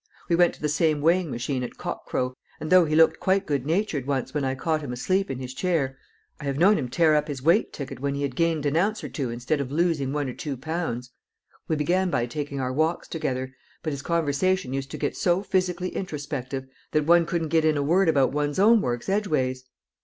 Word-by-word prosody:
We 170 - +4
went 175 0 +4
to - - -20
the - - +2
same 150 +1 +2
weighing 170 +3 +2
machine 125 +1 -2
at 125 - -6
cock - - -5
crow, 125 0 -1 0.3
and 155 - -5
though 185 -2 +7
he 155 0 0
looked 160 0 +5
quite 195 +1 +1
good 140 -4 -1
natured 160 -6 0
once 135 -3 -1
when 150 -1 -1
I 130 0 0
caught 155 +3 -1
him 140 -4 -5
asleep 185 +10 0
in 135 - -3
his 130 0 -6
chair, 150 -6 0 0.4
I 150 - -7
have 140 -1 -1
known 195 +5 +5
him 125 -4 -3
tear 155 +5 +3
up 150 0 +2
his 140 -4 -5
weight 170 +8 +3
ticket 140 -4 -7
when 140 +1 -1
he 140 - -2
had 135 -3 -2
gained 165 -2 +1
an 145 +1 +1
ounce 205 +6 +1
or - - -5
two 135 -6 -3
instead 125 +6 -1
of 135 -1 -5
losing 155 -4 +1
one 145 -1 -1
or 125 - -4
two 140 -1 -5
pounds. 130 -5 -4 0.6
We 160 - +1
began 180 +5 +1
by 120 -8 +1
taking 140 +3 -4
our 130 -1 -2
walks 160 +4 0
together, 130 -5 -3 0.3
but 155 - -2
his 140 - -5
conversation 170 -1 0
used 135 0 -3
to - - -6
get - - -2
so 180 0 +1
physically 185 -2 0
introspective 140 -7 -4 0.3
that 150 -1 +2
one 170 +1 +5
couldn't 165 -3 -1
get 160 0 +3
in 155 -1 +3
a 140 - 0
word 175 +4 +3
about 140 -4 +3
one's 145 0 -1
own 220 +3 +6
works 120 -1 -2
edgeways." 150 -11 0
150 Hz, 235 wpm, -25 LUFS, 135-170 Hz, 0.6 s, though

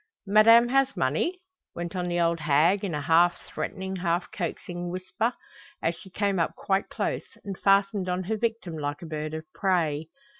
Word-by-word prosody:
"Madame 230 +4 +6
has 270 +1 +2
money?" 165 - 0 0.3
went 175 +2 -5
on 180 -1 -1
the 175 0 0
old 170 0 +2
hag 155 +6 +3
in 180 -6 -2
a 150 - -2
half 170 +4 +4
threatening, 190 0 -4
half 175 0 -1
coaxing 175 0 -4
whisper, 185 +6 -2 0.5
as 165 - 0
she 180 +3 -13
came 200 0 0
up 165 - 0
quite 195 0 0
close, - - -3
and 200 -1 -4
fastened 195 -1 +3
on 180 +1 -1
her 220 +5 -1
victim 225 -6 -2
like 145 +4 -4
a - - -6
bird 155 -1 -4
of 160 0 -6
prey. 160 -5 0
180 Hz, 180 wpm, -27 LUFS, 165-200 Hz, 0.5 s, Madame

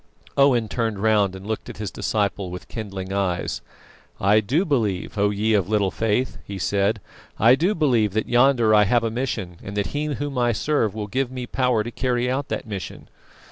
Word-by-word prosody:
Owen 130 -5 +4
turned 115 -2 -2
round 100 -2 +2
and 95 +1 -10
looked 110 0 -4
at - - -8
his 105 -2 -4
disciple 100 -3 -1
with 90 0 -8
kindling 95 -4 -6
eyes. 95 -3 -1 0.6
"I 105 +3 +4
do 135 - +1
believe, 110 - -1
O 100 0 +2
you 105 +2 +1
of 95 0 -4
little 105 -3 +2
faith!" 115 +3 -1
he 100 - -7
said. 100 +3 +1 0.4
"I 115 +4 +6
do 175 +10 +2
believe 120 - +2
that 110 0 -1
yonder 120 -3 +4
I 105 -1 +6
have 120 +3 +2
a 115 - -1
mission, 105 -8 -3
and 100 +1 -7
that 100 - +1
He 145 +1 -1
Whom 145 -2 -3
I 120 -1 +2
serve 110 -4 0
will 105 -1 -3
give 130 +5 -1
me 125 -1 -5
power 125 -3 +1
to 120 - -6
carry 125 0 0
out 135 +2 -2
that - - -3
mission. 100 -4 -7
110 Hz, 200 wpm, -23 LUFS, 100-125 Hz, 0.6 s, I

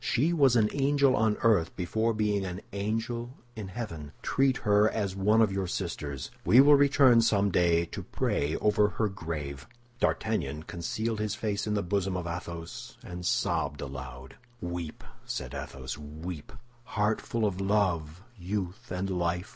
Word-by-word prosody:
She 150 +8 +2
was 135 -6 +4
an 110 -3 +5
angel 140 -1 +3
on 110 0 +2
earth 100 -8 +3
before 110 +6 0
being 105 -2 0
an 90 0 -5
angel 115 +4 -3 0.2
in 105 -3 -5
heaven. 90 -9 -6
Treat 135 -1 +2
her 105 +1 +5
as 100 -4 -2
one 105 +4 +4
of 105 - +2
your 95 -1 -1
sisters. 70 -5 -4
We 120 - +6
will 145 +2 +8
return 140 -4 +6
someday 90 -6 +3
to - - -7
pray 75 +3 -1
over 105 0 +3
her 105 +2 0
grave." 75 -8 -5 0.3
D'Artagnan 80 - 0
concealed 110 +7 -3
his 105 -1 -1
face 105 -2 -2
in 105 - 0
the 100 - 0
bosom 95 0 0
of 90 - -4
Athos, 85 -1 -6
and 90 0 -7
sobbed 80 -4 0
aloud. 65 -2 -8 0.2
"Weep," 85 -2 -5 0.2
said 60 - -5
Athos, 70 -1 -6
"weep, 75 +2 -7 0.3
heart 110 -3 0
full 115 -2 -1
of 100 -2 -1
love, 90 -5 0 0.2
youth, 95 +4 -4
and 90 +1 -2
life! 90 +1 -1
100 Hz, 155 wpm, -29 LUFS, 85-110 Hz, 0.3 s, will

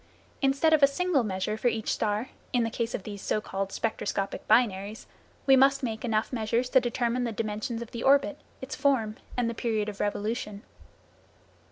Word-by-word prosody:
Instead 275 +4 +3
of 310 - +5
a 280 - +8
single 310 +1 +1
measure 210 0 -2
for 245 - 0
each 225 -2 0
star, 215 +3 -1 0.2
in 245 -2 +3
the 225 - -2
case 230 0 -2
of 195 - -5
the 205 0 -6
so 205 - -1
called 195 -1 -4
spectroscopic 200 -3 -2
binaries, 210 -2 +2 0.4
we 270 - +7
must 270 +1 +4
make 220 -3 -3
enough 220 0 0
measures 235 +2 0
to 260 - +7
determine 240 0 0
the 235 - -1
dimensions 225 +2 -3
of 230 - -13
the 235 - -5
orbit, 280 +2 +3 0.2
its 265 - -5
form 230 -7 +1 0.2
and 245 -2 +1
the 230 - -1
period 220 -2 -1
of 205 - -8
revolution. 210 0 -2
230 Hz, 185 wpm, -28 LUFS, 215-255 Hz, 0.4 s, a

